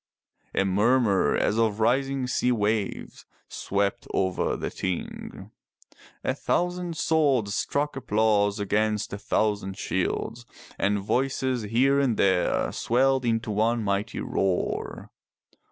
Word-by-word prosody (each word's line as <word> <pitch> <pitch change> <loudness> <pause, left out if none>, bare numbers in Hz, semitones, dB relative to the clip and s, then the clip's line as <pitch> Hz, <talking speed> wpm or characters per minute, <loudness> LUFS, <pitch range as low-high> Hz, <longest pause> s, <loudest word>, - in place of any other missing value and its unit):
'' - - -47
A 95 - +2
murmur 105 +1 +3
as 110 - +1
of 110 -2 +1
rising 135 +3 +1
sea 125 0 +1
waves, 105 -3 -2 0.2
swept 100 0 -2
over 95 -1 0
the - - -4
Ting. 95 -2 -5 0.7
A - - 0
thousand 175 -1 -1
swords 135 -10 +2
struck 145 +6 -1
applause 105 -4 +1
against 105 +1 0
a 100 - -4
thousand 100 -2 -1
shields, 115 +6 -2 0.3
and 100 +1 +2
voices 130 +4 0
here 135 +5 +3
and 130 -5 +1
there 95 -2 +2
swelled 130 +2 +1
into 115 -1 0
one 115 +2 +1
mighty 100 +2 -2
roar. 95 -2 -2
110 Hz, 120 wpm, -26 LUFS, 100-130 Hz, 0.7 s, murmur